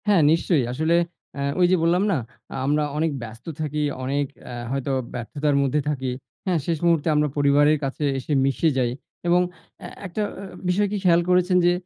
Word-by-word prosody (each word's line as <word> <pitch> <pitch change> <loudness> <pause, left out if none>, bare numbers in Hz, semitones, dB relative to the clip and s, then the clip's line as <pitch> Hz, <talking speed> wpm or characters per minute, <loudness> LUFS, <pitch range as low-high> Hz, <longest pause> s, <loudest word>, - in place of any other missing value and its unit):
হ্যাঁ, 200 -5 +5
নিশ্চয়ই। 165 -3 +2
আসলে 160 +5 +2 0.4
অ্যা 140 - -3 0.2
ওই 180 - +6
যে, - - +6
বললাম 175 +3 +3
না? 170 - +2 0.4
আ - - -5
আমরা 150 +2 +2
অনেক 160 +1 +1
ব্যস্ত 115 0 -10 0.2
থাকি 150 0 -2 0.2
অনেক 140 +2 0 0.2
এ্যা 125 - -7 0.2
হয়তো 135 0 -1 0.2
ব্যর্থতার 140 +4 -1
মধ্যে 140 +2 +1
থাকি। 130 -3 -2 0.3
হ্যাঁ, 180 -4 +1
শেষ 165 -1 0
মুহূর্তে 165 -2 +3
আমরা 150 0 +3
পরিবারের 145 +1 +4
কাছে 135 +2 -3 0.2
এসে 140 +4 -3
মিশে 135 +4 +2
যাই 125 -2 +1 0.4
এবং 175 +1 +5 0.4
এ - - -5 0.2
একটা 185 +4 -3 0.5
বিষয়কি 205 +3 +1
খেয়াল 175 -2 +5
করেছেন 180 0 +4
যে, 175 - +5
150 Hz, 175 wpm, -24 LUFS, 140-175 Hz, 0.5 s, ওই